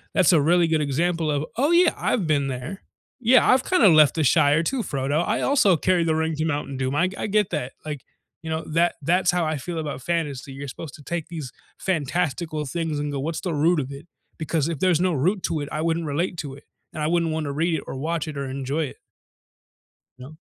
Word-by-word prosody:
That's 185 -1 +5
a 155 - +5
really 175 +3 +4
good 160 -1 +1
example 165 +3 0
of, 145 +1 0
"Oh 285 +5 +2
yeah, 345 0 +5
I've 205 -8 0
been 145 -3 +1
there. 135 +9 -5 0.4
Yeah, 250 +1 +5
I've 260 0 +4
kind 370 - +2
of 190 -6 +8
left 155 -3 +6
the 160 - +1
Shire 145 +4 +4
too, 260 +5 -1
Frodo. 145 0 -1
I 220 - 0
also 205 - +4
carry 180 +1 +2
the 160 -1 +1
ring 160 0 0
to 155 - 0
Mountain 145 -3 -2
Doom." 130 +1 -1
I 185 +4 +2
I - - -3
get 210 -1 +1
that, 145 -6 -3
like, 150 -3 -5 0.4
you 160 - -7
know, 160 0 -2
that 170 +2 +1
that's 180 +3 +2
how 175 -2 +2
I 155 -1 -1
feel 170 +4 -5
about 150 -4 -4
fantasy. 145 -5 -3
You're 140 +1 -7
supposed 140 +2 -8
to 145 - -14
take 170 0 -4
these 155 -7 -6 0.3
fantastical 155 -2 -1
things 160 +2 -3
and 145 0 -2
go, 140 - -3
what's 160 +3 -3
the 180 - -2
root 160 +3 +2
of 135 -2 -3
it? 140 +5 -10 0.3
Because 160 -2 -1
if 165 -4 -3
there's 180 -3 +3
no 180 -1 +1
root 180 +8 0
to 155 - -1
it, 145 - -5
I 155 - -2
wouldn't 165 0 0
relate 170 +5 -2
to 140 -3 -5
it, 140 - -15 0.3
and 155 - -6
I 150 - +1
wouldn't 170 -1 +1
want 155 -1 -2
to 140 - -3
read 165 +4 0
it - - -4
or - - -5
watch 160 +3 -2
it 150 -2 -6
or 140 - -3
enjoy 140 +4 -2
it. 135 - -9 1.2
No. 135 +5 -11
160 Hz, 240 wpm, -24 LUFS, 145-175 Hz, 1.2 s, of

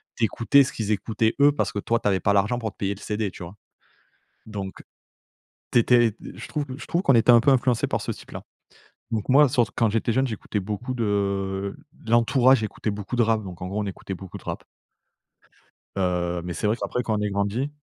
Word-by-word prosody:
tu 120 - -3
écoutais 130 +6 +4
ce 130 - -5
qu'ils 110 -2 -2
écoutaient 110 +1 0
eux, 145 +1 +6
parce 145 - -1
que - - -6
toi 115 +3 0
tu - - -2
avais 95 -2 +2
pas 100 - +2
l'argent 100 +4 +2
pour 110 -3 -3
te - - -35
payer 100 0 -2
le - - -15
CD, 105 -1 -2
tu 90 - -10
vois? 85 +3 -9 0.9
Donc, 100 -3 -7 0.9
tu - - +5
étais 120 0 +4
d - - -9
je - - -9
trouve 150 -2 -3
q 130 - -7
je - - -8
trouve 170 - 0
qu'on 135 - +4
était 115 +1 +6
un 120 - +7
peu 140 - +3
influencé 125 -3 +2
par - - -2
ce - - -3
type-là. - - -10 0.7
Donc 110 0 -2
moi, 140 +2 +6
surt 120 -5 +1
quand 115 - +2
j'étais 115 +1 0
jeune, 130 +3 +2
j'écoutais 110 -1 -4
beaucoup 105 +6 -4
de 100 -3 -1 0.3
l'entourage 120 +2 +4
écoutait 110 0 -3
beaucoup 105 +3 -5
de 120 - +4
rap, 110 -1 +1
donc, 90 -2 -9
en - - -3
gros, 100 +3 -2
on 105 - -2
écoutait 95 0 -6
beaucoup 95 0 -9
de - - -18
rap. - - -5 1.3
Heu, 90 -2 -1
mais 90 0 -4
c'est 105 - -4
vrai 105 - +2
qu'après, 125 +1 -3
quand 110 -2 -1
on - - -2
est 105 - 0
grandi 100 +8 -1
110 Hz, 230 wpm, -24 LUFS, 100-120 Hz, 1.3 s, un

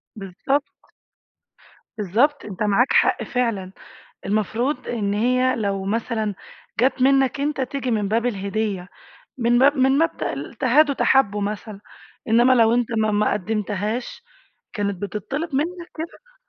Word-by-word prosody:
بالضبط. 210 +9 -4 1.1
بالضبط، 235 - +1
أنت 200 -1 -4
معاك 210 +5 +2
حق - - +3
فعلًا، 230 -7 -2 0.5
المفروض 220 +7 -1
إن 205 -4 -1
هي 255 +4 +2
لو 200 -3 -2
مثلًا 220 0 -2 0.4
جات 255 +2 +2
منّك 270 0 +3
أنت، 290 -1 -1
تيجي 260 -1 -3
من 210 -3 0
باب 225 +3 0
الهديّة، 200 -3 -2 0.5
من 240 0 +3
مب 280 +3 +5
من 265 +1 +3
مبدأ 155 - -2
تهادوا 280 +3 +4
تحابوا 210 -7 +2
مثلًا. 205 0 -5 0.5
إنّما 240 +3 +5
لو 230 -2 +4
أنت 245 -1 +1
ما 215 0 +2
ما 210 0 +1
قَدِّمتهاش، 210 +3 -3 0.5
كانت 200 -3 -3
بتتطّلب 265 - -4
منك 340 +5 -2
كده؟ - - -8
230 Hz, 125 wpm, -22 LUFS, 205-265 Hz, 1.1 s, مب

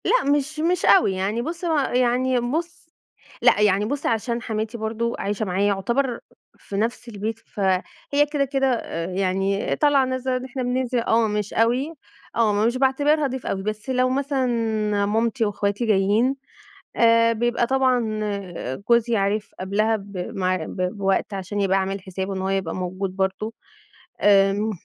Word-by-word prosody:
لأ - - +3
مش 290 +1 0
مش 350 +3 +1
أوي، 355 - +5
يعني 195 +5 -1
بُصّ 335 +6 -5
هو 325 -2 +1 0.2
يعني 250 +1 +2
بُصّ 325 +9 -3 0.5
لأ - - +5
يعني 205 0 +3
بُصّ، 285 +5 -3
عشان 235 +1 0
حماتي 220 0 -3
برضو 230 +1 -2
عايشة 205 +2 -2
معايا 195 +2 +1
يُعتبر 235 +6 0 0.4
في 200 - -9
نَفس 235 +3 -2
البيت، 220 +1 -4
فهي 200 +10 -1
كده، 285 -2 +1
كده، 270 0 0
آآ، 165 -7 -4
يعني 195 +2 0
طالعة 285 -3 +3
نازلة، 260 0 -2
آدي 255 0 -3
إحنا 260 0 -4
بننزل 250 0 0
آه 230 -1 +2
مش 210 -1 -2
أوي، 250 +7 +1 0.4
آه 215 -2 +2
مش 240 +2 +1
باعتبرها 285 +3 +2
ضيف 260 -1 -6
أوي، 195 0 -2
بس 215 +2 -4
لو 255 0 +2
مثلًا 270 0 0 0.6
مامتي 225 +3 +1
وإخواتي 205 +2 -1
جايين 215 +5 +2 0.6
آآ، 230 0 +5
بيبقى 240 +1 0
طبعًا 250 -4 +1 0.7
جوزي 235 0 +4
عارف 205 +1 0
قبلها 210 +4 +1
ب 200 -1 -10 0.2
مع 185 -1 +1
ب - - -8 0.2
بوقت 195 +1 0
عشان 195 +1 -4
يبقى 195 -1 +2
عامل 195 +1 -2
حسابه 190 +1 -5
إن 190 - -3
هو 190 - -1
يبقى 195 -4 -1
موجود 185 +1 -4
برضو، 195 +3 -2 0.7
آآ، 200 +1 +4
225 Hz, 155 wpm, -23 LUFS, 200-255 Hz, 0.7 s, أوي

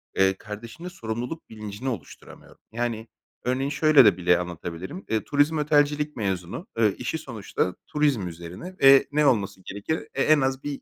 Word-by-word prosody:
eee, 95 0 +4
kardeşimde 115 - -9
sorumluluk 120 0 -5
bilincini 110 +3 -5
oluşturamıyorum. 100 - -9
Yani, 115 -1 -3 0.4
örneğin 130 +2 0
şöyle 150 -3 +6
de 95 -4 +5
bile 90 -1 +3
anlatabilirim, 90 - -6
eee, 110 -1 0
turizm 145 +2 +2
otelcilik 150 0 +2
mezunu. 95 - -3
Eee, 110 -3 +3
işi 125 +6 -3
sonuçta 110 - -3
turizm 145 -10 +1
üzerine 85 - -8
ve 135 0 +8
ne 150 +1 +2
olması 100 -7 +1
gerekir? 105 +11 -3
E, 135 - -1
en 155 -2 +5
az 135 +1 -1
bir 145 -1 -4
120 Hz, 155 wpm, -25 LUFS, 100-145 Hz, 0.4 s, ve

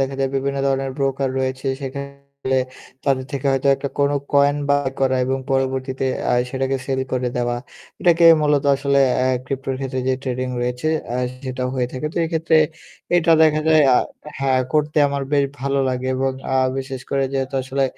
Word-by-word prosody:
দেখা 135 0 -1
যায় 135 - +1
বিভিন্ন 140 +1 -1
ধরনের 135 0 0
ব্রোকার 135 -1 0
রয়েছে। 130 +1 -2 0.2
সেখানে 140 +1 -4 1.0
তাদের 135 -2 +1
থেকে 140 0 -2
হয়তো 135 +1 +1
একটা 140 - -4
কোন 140 0 +3 0.2
কয়েন 145 0 +4
বাই 145 -1 +2
করা 130 -1 +2
এবং 135 +1 -1
পরবর্তীতে 130 0 -1 0.3
আ - - +3 0.2
সেটাকে 135 0 -1
সেল 135 -1 -1
করে 125 -1 0
দেওয়া। 120 0 0 0.4
এটাকে 170 -1 +4 0.2
মূলত 145 -1 +2
আসলে 140 0 +1 0.3
আ - - +2 0.2
ক্রিপটোর 135 0 -3
ক্ষেত্রে 130 -1 -3
যে 130 - +3
ট্রেডিং 130 -1 -2
রয়েছে 125 +5 -1 0.3
আ - - 0 0.3
সেটা 130 0 -4
হয়ে 125 -1 0
থাকে। 130 +3 -3
তো - - -15
এক্ষেত্রে 160 0 +1 0.6
এটা 165 -1 +4
দেখা 155 -1 +4
যায় 155 -1 +6
আ - - +6 0.4
হ্যাঁ 135 -1 +2
করতে 150 0 +1
আমার 140 0 -2
বেশ 140 -1 +4 0.2
ভালো 140 0 0
লাগে 130 0 -2
এবং 135 0 0 0.2
আ - - +2 0.2
বিশেষ 135 -1 -5
করে 135 -1 +1
যেহেতু 135 0 -2
আসলে 135 +1 -1
135 Hz, 175 wpm, -21 LUFS, 130-140 Hz, 1.0 s, যায়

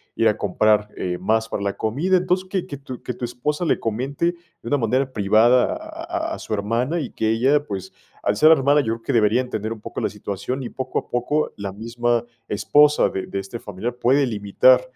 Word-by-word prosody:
ir - - +3
a - - +2
comprar, 105 -1 +2
eh, 90 -1 -2
más 110 +5 +1
para 100 - -3
la 100 0 -1
comida". 145 +13 +1
Entonces, 185 +1 0
que 190 -3 -1
que 140 - -6
tu 130 -2 -9
que 125 - -3
tu 120 - -4
esposa 150 +7 -2
le - - +1
comente 130 +8 -2 0.4
de - - -11
una 145 - +2
manera 130 +2 0
privada 115 - +4
a 330 +1 -5
a - - -2
a - - -10
su - - -5
hermana 115 +10 0
y 140 - -4
que 110 - -1
ella, 135 +6 +2
pues, 95 -7 -6 0.3
al 100 - +1
ser 155 +4 +7
hermana, 145 -1 +4
yo 115 -4 -1
creo 115 - -13
que 140 - -2
debería 115 +1 +3
entender 110 -3 -4
un 110 - -13
poco - - -6
la - - 0
situación 105 +7 -4
y 120 - -5
poco 130 -1 -3
a - - -13
poco 135 +5 0
la 100 -2 -5
misma 120 +2 -1 0.3
esposa 150 +8 +4
de 95 - -4
de 100 - -3
este 95 +5 -7
familiar 105 +5 -5
puede 135 +4 +3
limitar 115 +3 +4
120 Hz, 220 wpm, -22 LUFS, 110-145 Hz, 0.4 s, ser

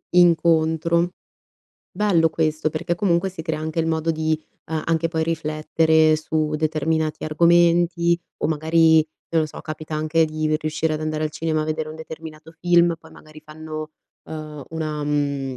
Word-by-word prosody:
Incontro. 170 -1 +3 0.8
Bello 180 -5 +2
questo 155 -1 0
perché, 170 +3 -2
comunque, 175 0 +1
si 185 -3 -8
crea 160 -1 -2
anche 160 +1 -4
il 165 - -1
modo 160 0 0
di, 155 0 -1 0.3
uhm, 160 -1 -2
anche 165 0 +1
poi 160 -1 -1
riflettere 155 0 +2
su 155 0 -1
determinati 155 0 -1
argomenti 170 +1 +3 0.2
o - - 0
magari, 160 +1 +4 0.3
non 165 -1 +2
lo - - -1
so, 150 - -10
capita 155 0 -6
anche 155 +1 +2
di 155 0 -1
riuscire 155 0 -1
ad 155 - -4
andare 155 0 -2
al 155 - -2
cinema 155 0 -1
a - - -3
vedere 155 0 -3
un 155 - -8
determinato 160 0 -10
film, 175 -1 +4
poi - - -17
magari 155 0 -14
fanno, 155 0 -7 0.3
ehm, 155 -2 -7
una, 155 -2 -3
mhmm, 140 -3 -1
160 Hz, 160 wpm, -22 LUFS, 155-165 Hz, 0.8 s, magari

